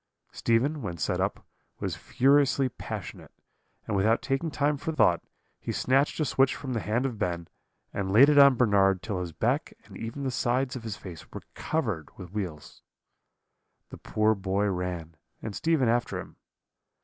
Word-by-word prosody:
"Stephen, 135 +6 +1
when 90 -6 -4
set 75 - -1
up, - - -2 0.3
was - - -2
furiously 140 0 +3
passionate, - - -7 0.6
and 110 - -2
without 110 +4 +3
taking 135 +4 -1
time 145 0 +1
for 155 +3 -4
thought, 90 - +3 0.4
he - - -4
snatched 135 +5 +1
a 155 - +2
switch 135 -2 +2
from 130 -3 -5
the 115 - 0
hand 110 +7 -1
of 120 -6 -3
Ben, 85 -2 -2 0.5
and 95 -1 -2
laid 125 +8 +8
it 145 -1 +5
on 140 -2 +8
Bernard 100 -6 +3
till 105 -4 -3
his 90 -2 -4
back - - -1
and - - -14
even 115 +5 -6
the 130 - -1
sides 125 +2 0
of 125 - -5
his 110 -3 -5
face 85 -5 -10
were - - -8
covered 110 - -2
with 90 -3 -9
wheals. 90 -8 -6 1.1
The - - -10
poor 110 0 +2
boy 100 0 -1
ran, 90 -3 -4 0.2
and 105 - -6
Stephen 160 -6 +2
after 120 +1 0
him. - - -10
115 Hz, 175 wpm, -28 LUFS, 95-135 Hz, 1.1 s, laid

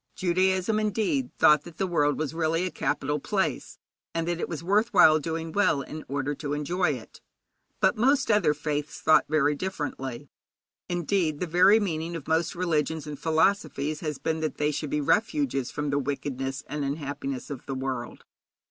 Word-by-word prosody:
Judaism, 185 +3 +1
indeed, 195 - 0
thought 150 -1 +6
that 170 +1 -13
the 195 - 0
world 145 -5 +1
was 155 -1 -2
really 165 +2 0
a 185 - -3
capital 145 +2 -1
place, 180 - -2 0.4
and 165 0 -1
that 175 -1 -1
it - - -3
was 165 -1 -5
worth 210 +6 +2
while 155 0 +7
doing 165 +1 -4
well 165 -7 +2
in 155 +4 -8
order 140 +1 -2
to 145 0 -4
enjoy 155 +2 0
it. 120 -4 -10 0.6
But - - +3
most 265 +2 +3
other 175 -8 +3
faiths 150 0 -3
thought 155 - +4
very 150 -1 +3
differently. 145 -6 -5 0.6
Indeed, 175 -3 0
the - - -1
very 185 +6 +5
meaning 170 -4 -2
of 165 - -7
most 160 +2 +1
religions 160 -3 -1
and 150 -2 -7
philosophies 155 -2 +1
has 150 -3 -3
been 160 0 -2
that 155 -1 -2
they 150 0 +1
should 150 0 -3
be 150 - 0
refuges 215 - +1
from 150 -1 -3
the 145 - +1
wickedness 135 -1 -3
and 150 0 -4
unhappiness 140 -2 -4
of 135 -3 -7
the 135 - -3
world. 130 -2 -4
155 Hz, 175 wpm, -27 LUFS, 145-180 Hz, 0.6 s, while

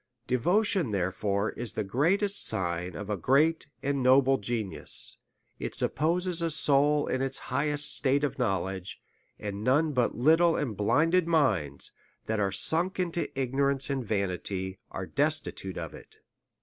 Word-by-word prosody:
Devotion, 175 - +1
therefore, 100 +2 -1
is 120 -1 -5
the 110 - -2
greatest 185 - +1
sign 90 -3 -2
of 105 - -6
a 105 - -1
great 145 - +2 0.2
and 140 -1 -1
noble 135 +1 +4
genius, 110 -2 -2 0.4
it - - -5
supposes 170 +3 0
a 165 - 0
soul 145 0 +4
in 130 - -2
its 135 0 0 0.2
high 150 - +1
est 145 0 +2
state 140 0 +2
of 145 - -2
knowledge; 95 -4 -2 0.4
and 100 0 -6
none 150 +6 +2
but 125 -4 0
little 160 +6 +4
and 120 -8 -2
blinded 160 - +2
minds, 105 - 0 0.3
that 110 -1 -2
are 100 -1 0
sunk 165 - +2
into 175 -1 -1
ignorance 135 +1 0
and 135 -2 -2
vanity, 95 -2 -3
are 95 - -5
destitute 145 -8 -2
of - - -6
it. - - -13
135 Hz, 150 wpm, -28 LUFS, 100-155 Hz, 0.4 s, noble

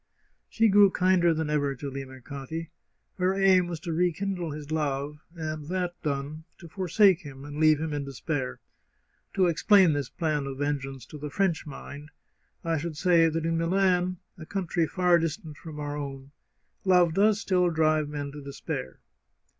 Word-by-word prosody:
She 225 0 +3
grew 205 -1 +6
kinder 185 -2 +3
than 160 -1 -1
ever 145 -2 0
to 140 +2 -6
Limercati. 135 +4 -7 0.5
Her 185 +1 +2
aim 190 -2 +4
was 170 -2 -5
to 170 -2 -3
rekindle 180 +1 -1
his 150 0 -7
love, 150 -1 -2 0.2
and 155 -2 -5
that 180 0 -2
done, 145 +1 -3
to 170 - -12
forsake 190 +1 +3
him 140 -2 -10
and 145 +1 -7
leave 155 -1 +5
him 160 -1 -3
in 145 -1 -2
despair. 140 0 -4 0.8
To 190 -2 +4
explain 175 +1 +5
this 145 -3 -2
plan 150 -4 -1
of 135 -1 -5
vengeance 135 -3 -3
to 150 - -10
the 150 +1 -5
French 175 -1 0
mind, 145 +1 -9 0.5
I 165 -2 0
should 160 0 -5
say 170 -2 +4
that 165 0 -2
in 165 0 0
Milan, 180 +1 +2 0.2
a 160 - -8
country 175 -4 -1
far 180 -1 +3
distant 160 -2 -4
from 150 0 -9
our 145 0 -4
own, 140 -1 -6 0.5
love 180 -3 +4
does 205 +3 +3
still 180 -4 +2
drive 155 -2 +2
men 145 -1 -4
to 145 +1 -9
despair. 140 - -6
160 Hz, 170 wpm, -27 LUFS, 145-180 Hz, 0.8 s, grew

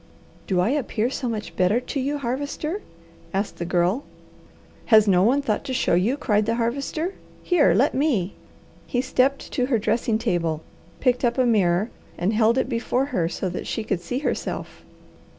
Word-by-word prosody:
"Do 185 -2 +1
I 180 - +3
appear 250 -4 0
so 255 -3 -2
much 220 -2 -5
better 185 +6 +3
to 255 +2 -4
you, 280 +3 -1
Harvester?" 285 - -3 0.5
asked 200 +2 -2
the 170 - -2
Girl. 180 +9 +1 0.8
"Has 215 -2 +6
no 180 -2 +5
one 260 +8 +3
thought 215 -6 -1
to 260 - -3
show 250 - +1
you," 205 +11 +2
cried 210 -6 +1
the 230 - +1
Harvester. 275 +9 -2 0.3
"Here, 300 - +4
let 265 +9 +3
me!" 255 - +1 0.5
He 245 - -1
stepped 265 +1 +1
to 250 -1 0
her 255 -4 +2
dressing 225 +1 +1
table, 170 -8 -1 0.4
picked 250 -1 +2
up 240 0 +1
a 255 - +3
mirror, 200 -2 +2 0.3
and 185 +5 0
held 225 +2 +3
it 260 - +1
before 245 +1 0
her 170 -2 +1
so 190 - -3
that 180 - -5
she 225 - -2
could 195 -4 -2
see 210 +9 -3
herself. 285 - -3
230 Hz, 180 wpm, -24 LUFS, 195-265 Hz, 0.8 s, Has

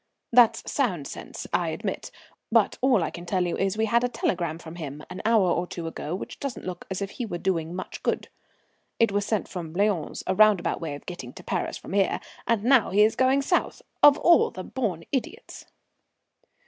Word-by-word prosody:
"That's 240 -2 +6
sound 190 - -1
sense, - - -7
I - - +1
admit. - - -4 0.4
But - - +3
all 250 -8 +4
I - - -2
can 175 - -8
tell 185 -1 +1
you 175 - -1
is 195 +1 -1
we 220 - +2
had 235 +2 +2
a 245 - +1
telegram 170 -8 -1
from 165 0 -10
him 150 -2 -6
an 180 - -6
hour 215 -5 +4
or 175 +1 0
two 170 -1 -6
ago 165 0 -4
which - - -7
doesn't 275 -3 -5
look 180 -1 -6
as 190 +1 -2
if 195 - -5
he 245 - -4
was 175 -4 -5
doing 170 -3 -1
much 185 - -6
good. - - -1 0.7
It 230 -2 +4
was 200 +1 0
sent 215 -3 0
from 170 -4 -6
Lyons, 195 -4 0
a 190 - +1
roundabout 210 -4 +4
way 155 -3 -3
of 145 - -12
getting 130 -9 -7
to - - -11
Paris - - -2
from - - -9
here, 195 -1 +2 0.3
and 230 -3 +1
now 250 -1 +5
he's 210 +3 +4
going 265 +2 +3
south! 355 - 0 0.2
Of 290 0 +8
all 340 -1 +5
the 185 - -7
born 195 -11 -3
idiots!" 265 -3 -4
195 Hz, 205 wpm, -26 LUFS, 175-230 Hz, 0.7 s, Of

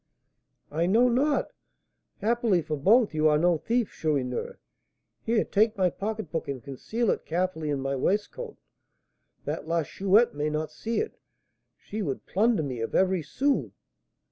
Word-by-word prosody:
"I 165 +3 0
know 235 +6 +4
not. 280 +5 +1 0.7
Happily 220 -5 +2
for 155 - -2
both, 205 - +4
you 155 0 +3
are 150 -1 +4
no 170 0 +3
thief, 235 +3 0
Chourineur. 135 -6 -2 0.6
Here, 225 0 +1
take 215 +2 +2
my 185 -2 +2
pocketbook, 195 -6 -4
and 135 -3 -5
conceal 210 - -1
it - - -2
carefully 170 -2 -2
in 140 -2 -1
my 135 +1 -1
waistcoat, 210 - -2 0.9
that - - -4
La 165 0 +1
Chouette 200 +8 +3
may 150 +1 -1
not 155 +1 -2
see 225 +9 -2
it; 445 - -4 0.6
she 215 +2 -6
would 140 -9 -3
plunder 215 -2 +2
me 130 -4 -4
of 115 - -3
every 185 -1 +3
sou." 270 - 0
185 Hz, 150 wpm, -27 LUFS, 150-225 Hz, 0.9 s, know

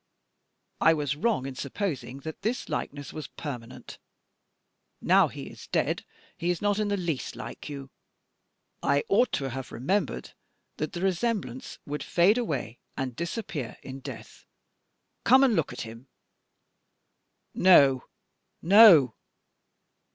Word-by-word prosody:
I 165 - +5
was 145 -2 -1
wrong 165 - 0
in 135 - -5
supposing 140 - -4
that 160 +2 -7
this 230 +4 -2
likeness 145 -1 -4
was 155 - -6
permanent. 125 -6 -8 1.0
Now - - +4
he - - -8
is - - -11
dead, - - -1 0.3
he 170 - -2
is 180 - 0
not 205 0 +1
in 210 - 0
the 205 0 0
least 170 -7 -3
like - - -8
you. 140 -2 -8 0.9
I 140 0 +2
ought 235 +6 +3
to 135 -2 -1
have 130 0 -6
remembered 155 - -1 0.5
that 155 - -3
the 175 - -4
resemblance 190 - -2
would 145 +1 -4
fade 195 +7 +3
away 135 - -3 0.2
and 130 -3 -3
disappear 170 - -4
in 135 0 -8
death. - - -10 0.8
Come 265 +1 +6
and 250 -5 +4
look 160 - 0
at - - -6
him." 115 +3 -9 1.5
"No, 140 -8 +5 0.5
no." 175 - +8
150 Hz, 130 wpm, -27 LUFS, 135-195 Hz, 1.5 s, no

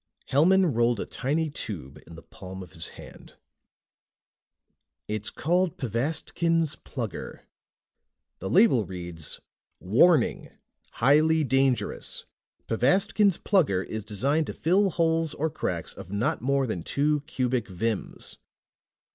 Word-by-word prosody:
Hellman 175 +4 +4
rolled 120 -1 +2
a - - -2
tiny 155 +4 -2
tube 85 - -6
in 85 - -11
the 80 - -12
palm 95 0 -9
of 90 - -14
his 80 0 -4
hand. - - -13 1.7
"It's 105 0 -2
called 175 +2 0
Pvastkin's 155 - 0
Plugger. 120 -6 -6 1.0
The 95 - -4
label 190 - +5
reads: 85 -5 -5 0.4
WARNING! 130 - +3 0.4
HIGHLY 155 +5 +4
DANGEROUS! 135 -1 0 0.4
PVASTKIN'S 190 - +3
PLUGGER 145 - +2
IS 110 +1 -5
DESIGNED 135 +10 0
TO - - -4
FILL 190 +5 +2
HOLES 165 -2 +1
OR 160 +1 -1
CRACKS - - -3
OF - - -11
NOT 100 +4 -1
MORE 135 +2 +1
THAN 100 -8 -3
TWO 150 +1 +1
CUBIC 125 -3 -1
VIMS. 105 +3 -4
135 Hz, 115 wpm, -26 LUFS, 105-160 Hz, 1.7 s, label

